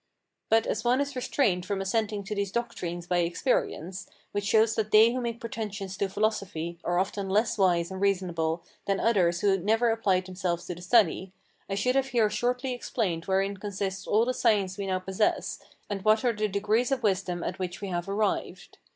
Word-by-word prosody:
But 225 0 +4
as - - -2
one 245 +2 +3
is 285 -1 -2
restrained 245 -7 +1
from 195 +1 -2
assenting 205 +1 -1
to 210 +2 -4
these 200 -2 -2
doctrines 180 -7 -3
by 180 0 0
experience, 175 - -1 0.2
which 205 0 -2
shows 220 +1 +4
that 215 -1 -1
they 220 +2 +6
who 255 - -2
make 235 -1 -3
pretensions 210 -4 -5
to 200 - 0
philosophy 190 -5 -2
are 175 0 0
often 195 +1 -1
less 210 +3 +2
wise 175 -3 +2
and 190 0 -6
reasonable 175 -4 0 0.2
than 195 -1 +1
others 180 -7 +2
who 195 -1 +3
never 225 +5 +2
applied 195 -5 +1
themselves 180 -2 -3
to - - -4
the 175 - -11
study, 190 -2 +2 0.4
I 195 - -1
should 250 +6 +1
have 270 0 +2
here 225 -5 +2
shortly 250 +4 -1
explained 200 -8 -2
wherein 195 +1 0
consists 195 -1 -4
all 220 +3 +3
the 255 - 0
science 205 -7 +2
we 200 -1 -4
now 185 -1 +1
possess, 190 +3 -1 0.3
and 200 -2 -4
what 215 +3 +3
are 240 - +3
the 215 0 0
degrees 210 +6 +1
of 260 -3 0
wisdom 185 -4 0
at 185 - -4
which 180 -1 -4
we 200 - -5
have 175 +1 -3
arrived. 205 +1 -2
200 Hz, 195 wpm, -28 LUFS, 185-225 Hz, 0.4 s, they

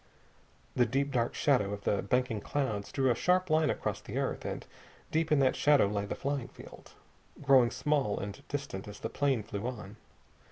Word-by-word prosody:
The 120 -1 +3
deep 140 +4 0
dark 120 -3 0
shadow 115 -9 +2
of 100 0 -7
the 100 - +1
banking 120 +1 0
clouds 110 -8 -2
drew 130 -2 +2
a - - +2
sharp 180 +5 +2
line 155 0 +3
across - - -2
the - - -6
earth, - - -2
and - - -4 0.5
deep 160 0 0
in 150 - +5
that 130 - +3
shadow 145 -4 +4
lay 100 0 -1
the - - -4
flying 140 -2 -2
field, - - -14 0.5
growing 130 -4 +6
small 140 -7 0
and 100 0 -6
distant 140 -10 -5
as 105 0 -10
the 115 - -3
plane 135 -3 0
flew 100 +3 -4
on. 105 -4 -7
125 Hz, 190 wpm, -31 LUFS, 105-145 Hz, 0.5 s, growing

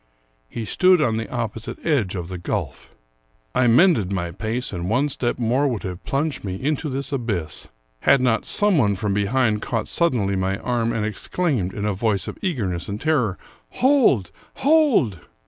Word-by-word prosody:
He 115 - -5
stood 185 - +4
on 115 -7 +1
the 115 - -4
opposite 115 -2 -4
edge 125 - +1
of 85 -3 -4
the 90 -1 -6
gulf. 90 - -4 0.6
I 125 -1 +3
mended 120 - +4
my 85 -3 -2
pace, 115 +6 -3
and 90 0 -3
one 130 +6 +2
step 120 -3 -1
more 125 +5 +1
would 120 -6 -2
have 90 -1 -6
plunged 145 +2 -1
me 95 -3 -3
into 150 +7 -2
this 135 +1 -3
abyss, 100 - -2 0.3
had 140 - +4
not 125 -3 +1
some 205 -6 +2
one 100 -5 +2
from 100 +1 -1
behind 105 +2 +1
caught 115 -3 -2
suddenly 115 - +1
my 95 +1 -1
arm, 120 -1 -1
and 110 -2 -1
exclaimed, 110 - -1
in 100 +1 -4
a 105 - +1
voice 100 0 0
of - - -7
eagerness 105 - -2
and 100 +1 -4
terror, 125 - +1 0.2
" - - -39
Hold! 245 - +4 0.2
hold 275 - +3
115 Hz, 180 wpm, -22 LUFS, 100-140 Hz, 0.6 s, stood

